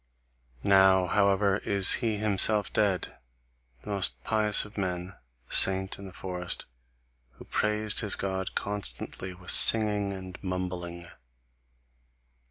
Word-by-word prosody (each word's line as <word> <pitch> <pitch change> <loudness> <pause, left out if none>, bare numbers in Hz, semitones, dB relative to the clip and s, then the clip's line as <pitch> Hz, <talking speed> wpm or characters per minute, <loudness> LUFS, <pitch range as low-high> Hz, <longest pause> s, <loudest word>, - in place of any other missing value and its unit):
Now, 95 -1 +3
however, 100 +1 0
is 100 -2 +2
he 110 -3 -2
himself 105 0 +1
dead, 100 -5 -2 0.7
the 105 - -8
most 100 -2 -2
pious 110 -2 +1
of 105 - -16
men, 90 -2 -5 0.3
the - - -6
saint 95 0 +5
in 100 - -11
the 95 - -10
forest, 90 -1 -6 0.7
who - - -16
praised 105 0 -2
his 105 -3 +1
God 95 -1 -5
constantly 95 -1 -4
with 90 0 -2
singing 105 -2 +6
and 95 -1 -10
mumbling. 90 -2 -6
95 Hz, 120 wpm, -26 LUFS, 95-105 Hz, 0.7 s, singing